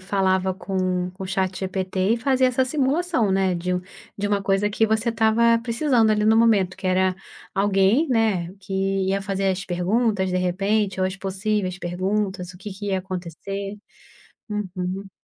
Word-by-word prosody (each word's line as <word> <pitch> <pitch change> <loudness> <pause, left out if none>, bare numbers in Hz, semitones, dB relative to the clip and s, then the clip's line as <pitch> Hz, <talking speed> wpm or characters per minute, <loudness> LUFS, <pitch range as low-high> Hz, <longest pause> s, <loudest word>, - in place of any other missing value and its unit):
falava 190 -1 +1
com 185 -1 -2
com 190 +1 -10
o - - -4
ChatGPT 190 +1 -1
e - - -2
fazia 260 +1 +2
essa 255 +1 +1
simulação, 280 - +1
né, 190 -1 +2
de 180 +1 -2
um 180 - -1 0.4
de 205 - -1
uma 205 -1 0
coisa 195 +1 +1
que 220 +2 +1
você 220 +2 +1
estava 230 +1 +3
precisando, 235 -1 +2
ali, 210 0 +2
no 220 +1 +5
momento, 210 -6 +3
que - - -15
era 185 0 +2 0.4
alguém, 200 +9 +3
né, 215 -8 +1
que 195 0 -10 0.4
ia 195 +1 0
fazer 195 0 -1
as 190 +1 -3
perguntas, 190 +2 0
de 180 - 0
repente, 195 +2 0
ou 185 - +3
as 185 - -3
possíveis 195 -1 -2
perguntas, 185 +1 -2
o 180 - -15
que 200 +2 -7
que 200 +2 -7
ia 190 -2 0
acontecer. 190 +2 -5 0.7
Uhum. 190 -1 -4
195 Hz, 170 wpm, -23 LUFS, 185-220 Hz, 0.7 s, no